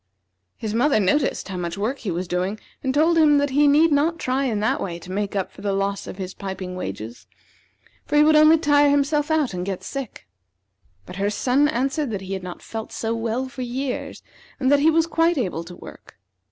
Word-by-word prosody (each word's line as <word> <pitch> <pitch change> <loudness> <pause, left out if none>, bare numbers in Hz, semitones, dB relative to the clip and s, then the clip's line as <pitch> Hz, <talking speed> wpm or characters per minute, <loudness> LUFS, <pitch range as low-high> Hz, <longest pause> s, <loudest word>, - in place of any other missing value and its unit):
His 215 -2 -4
mother 245 +2 +3
noticed 210 +9 +1
how 190 - -4
much 170 0 -4
work 230 +7 -2
he 215 - -4
was 175 +1 -3
doing, 185 +4 -2 0.2
and 265 - 0
told 320 +4 +3
him 295 -2 +5
that 285 -1 +1
he 290 +2 +4
need 305 +3 +5
not 305 +4 +2
try 265 0 -1
in 225 -5 -1
that 215 - 0
way 175 -3 -4
to 175 +2 -11
make 205 +1 -2
up 195 -2 -2
for - - -14
the 200 -1 -1
loss 195 0 -2
of - - -8
his 190 -1 -5
piping 190 -2 -6
wages; 110 - -7 0.8
for 295 - -1
he 295 - +7
would 310 0 +5
only 310 +1 +7
tire 290 -2 +4
himself 290 +1 +1
out, 310 -8 +1
and 180 0 -3
get 190 -1 -4
sick. 275 - -7 0.8
But 180 - -9
her 200 +1 0
son 255 +7 +2
answered 275 +1 -1
that 205 -3 -4
he 190 0 -6
had 190 - -3
not 180 -1 -8
felt 225 -1 -6
so 225 0 -2
well 230 +3 -2
for 260 0 -8
years, 250 +2 -4 0.4
and 260 0 +2
that 285 - +5
he 305 +3 +4
was 325 0 +3
quite 330 0 +1
able 180 -9 -2
to 175 +1 -10
work. - - -13
245 Hz, 220 wpm, -23 LUFS, 195-290 Hz, 0.8 s, he